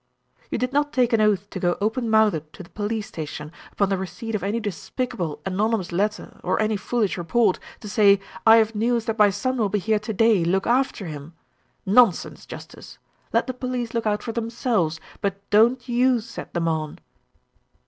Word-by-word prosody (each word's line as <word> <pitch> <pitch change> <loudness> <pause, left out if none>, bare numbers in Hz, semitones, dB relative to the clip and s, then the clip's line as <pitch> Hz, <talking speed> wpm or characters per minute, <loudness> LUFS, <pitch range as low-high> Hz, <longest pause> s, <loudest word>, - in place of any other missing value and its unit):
"You - - -2
did 250 +1 -2
not 290 +1 +1
take 245 -4 +2
an 225 - +4
oath 205 -2 +2
to 190 - -5
go 175 -1 +1
open 225 +3 -1
mouthed 210 -9 +2
to 190 - -10
the 170 - -17
police 210 0 -3
station, 150 -1 -7 0.2
upon 200 -2 0
the 195 - +1
receipt 190 +5 -6
of 210 - -1
any 205 +5 -1
despicable 205 - -4
anonymous 195 0 0
letter 210 +5 -2
or - - 0
any 215 0 +1
foolish 210 -2 -1
report, 205 +3 +2 0.2
to 210 - -8
say, 200 -2 +5 0.3
'I 225 - +10
have 225 0 +3
news 230 +1 0
that 225 0 -3
my 210 -1 +7
son 235 +7 -2
will 215 -4 +1
be 210 - 0
here 215 +2 +1
to 215 +1 -5
day; 220 -3 +3
look 190 +3 +1
after 245 -4 +1
him.' 155 0 -8 0.5
Nonsense, 205 -1 +3
justice! - - -11 0.3
Let - - +2
the 255 - -4
police 250 -2 -4
look 230 -1 -1
out 210 0 0
for 230 - -3
themselves, 225 -8 -1 0.2
but 200 0 -3
don't 235 +4 +4
you 245 0 +3
set 230 -3 -9
them 170 -1 0
on." 155 -2 -2
215 Hz, 190 wpm, -23 LUFS, 190-235 Hz, 0.5 s, I